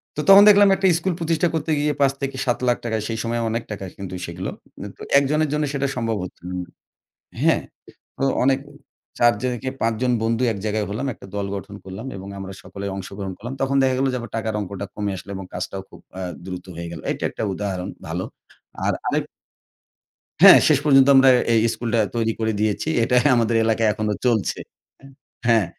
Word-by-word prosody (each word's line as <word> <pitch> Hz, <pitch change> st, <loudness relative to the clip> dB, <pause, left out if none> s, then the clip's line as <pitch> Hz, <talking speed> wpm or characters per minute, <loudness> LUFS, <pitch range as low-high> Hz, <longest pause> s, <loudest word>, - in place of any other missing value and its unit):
তো 150 Hz, -, -1 dB
তখন 195 Hz, +1 st, +10 dB
দেখলাম 205 Hz, 0 st, +7 dB
একটা 190 Hz, +1 st, -2 dB
স্কুল 185 Hz, +1 st, -1 dB
প্রতিষ্ঠা 165 Hz, +1 st, +1 dB
করতে 160 Hz, 0 st, -1 dB
গিয়ে 150 Hz, 0 st, +1 dB
৳৫,০০,০০০-৳৭,০০,০০০ 130 Hz, -4 st, 0 dB
য় 105 Hz, -, -4 dB
সেই 110 Hz, -1 st, -3 dB
সময় 115 Hz, 0 st, -1 dB
অনেক 115 Hz, +1 st, -2 dB
টাকা 100 Hz, -2 st, -5 dB
কিন্তু 95 Hz, -2 st, -6 dB
সেগুলো। 85 Hz, +2 st, -5 dB, 0.5 s
তো -, -, -17 dB, 0.2 s
একজনের 150 Hz, +2 st, +1 dB
জন্য 150 Hz, 0 st, 0 dB
সেটা 140 Hz, -1 st, 0 dB
সম্ভব 115 Hz, -3 st, -1 dB
হচ্ছিলো 90 Hz, 0 st, -8 dB
না। 90 Hz, -, -14 dB, 0.7 s
হ্যাঁ, -, -, +3 dB, 0.5 s
তো -, -, -1 dB, 0.2 s
অনেক 135 Hz, 0 st, +3 dB, 0.6 s
৪ 120 Hz, 0 st, +5 dB
জন 125 Hz, -1 st, 0 dB
কে 130 Hz, -, -2 dB
৫ 115 Hz, 0 st, +1 dB
জন 125 Hz, -1 st, +2 dB
বন্ধু 115 Hz, +2 st, 0 dB
এক 100 Hz, -, -7 dB
জায়গায় 105 Hz, -1 st, -1 dB
হলাম। 115 Hz, +7 st, -3 dB
একটা -, -, -13 dB
দল 100 Hz, -1 st, -2 dB
গঠন 100 Hz, +1 st, -8 dB
করলাম 95 Hz, +6 st, -8 dB
এবং 95 Hz, +1 st, -8 dB
আমরা 95 Hz, 0 st, -7 dB
সকলেই 100 Hz, 0 st, -6 dB
অংশগ্রহণ 95 Hz, 0 st, -6 dB
করলাম। 120 Hz, +4 st, -6 dB
তখন 135 Hz, +1 st, +1 dB
দেখা 130 Hz, -1 st, +2 dB
গেল 135 Hz, -, +2 dB
যে, -, -, -1 dB
আবার 120 Hz, -2 st, -8 dB
টাকার 110 Hz, -1 st, -2 dB
অঙ্কটা 100 Hz, 0 st, -5 dB
কমে 105 Hz, -1 st, -2 dB
আসলো 95 Hz, +3 st, -10 dB
এবং 95 Hz, -, -6 dB
কাজটাও 95 Hz, +1 st, -4 dB
খুব -, -, -14 dB, 0.2 s
আ -, -, -4 dB, 0.3 s
দ্রুত 90 Hz, -1 st, -6 dB
হয়ে 85 Hz, +1 st, -6 dB
গেল। 80 Hz, -, -7 dB
এটা -, -, -3 dB
একটা -, -, -6 dB
উদাহরণ 95 Hz, -2 st, -3 dB, 0.2 s
ভালো। -, -, -3 dB, 0.6 s
আর -, -, +2 dB
আরেক -, -, 0 dB, 1.2 s
হ্যাঁ, -, -, +11 dB
শেষ -, -, +5 dB
পর্যন্ত 135 Hz, -2 st, +6 dB
আমরা 135 Hz, 0 st, +7 dB, 0.2 s
এই 115 Hz, -, +5 dB
স্কুলটা 115 Hz, -1 st, -1 dB, 0.2 s
তৈরি 115 Hz, -1 st, +1 dB
করে 110 Hz, 0 st, 0 dB
দিয়েছি। 110 Hz, +7 st, 0 dB
এটাই 125 Hz, +2 st, +2 dB
আমাদের 115 Hz, -1 st, +1 dB
এলাকায় 110 Hz, 0 st, +2 dB
এখনো 105 Hz, 0 st, -1 dB
চলছে। 110 Hz, -8 st, +1 dB, 0.4 s
এ -, -, -13 dB, 0.4 s
হ্যাঁ, 115 Hz, -4 st, +4 dB
115 Hz, 190 wpm, -22 LUFS, 100-135 Hz, 1.2 s, হ্যাঁ